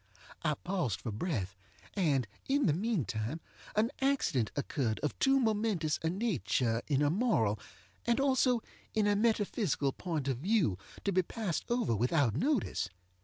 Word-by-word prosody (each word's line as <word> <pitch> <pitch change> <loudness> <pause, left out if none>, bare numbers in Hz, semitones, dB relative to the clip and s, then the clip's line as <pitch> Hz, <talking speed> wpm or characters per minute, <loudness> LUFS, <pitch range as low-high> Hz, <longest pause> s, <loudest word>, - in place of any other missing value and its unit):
I 150 - +1
paused 155 - -2
for 115 - -3
breath; 105 - -2 0.4
and, 145 - +1 0.2
in 280 +1 +2
the 155 - +4
meantime, 150 - -1 0.4
an 220 +4 +2
accident 260 - +2
occurred 135 -5 -1
of 150 - 0
too 270 0 +4
momentous 210 - +1
a 160 - +1
nature 165 - 0
in 145 -1 +2
a 145 - +3
moral, 155 - +2 0.5
and 235 +2 +3
also 260 -3 +3 0.3
in 215 -1 +3
a 205 0 +3
metaphysical 210 - +1
point 155 -3 -3
of 130 -3 0
view, 170 - +2 0.2
to 200 - +1
be 185 0 +4
passed 185 -2 -3
over 240 - +1
without 125 +2 +2
notice. 245 - 0
170 Hz, 150 wpm, -32 LUFS, -, 0.5 s, the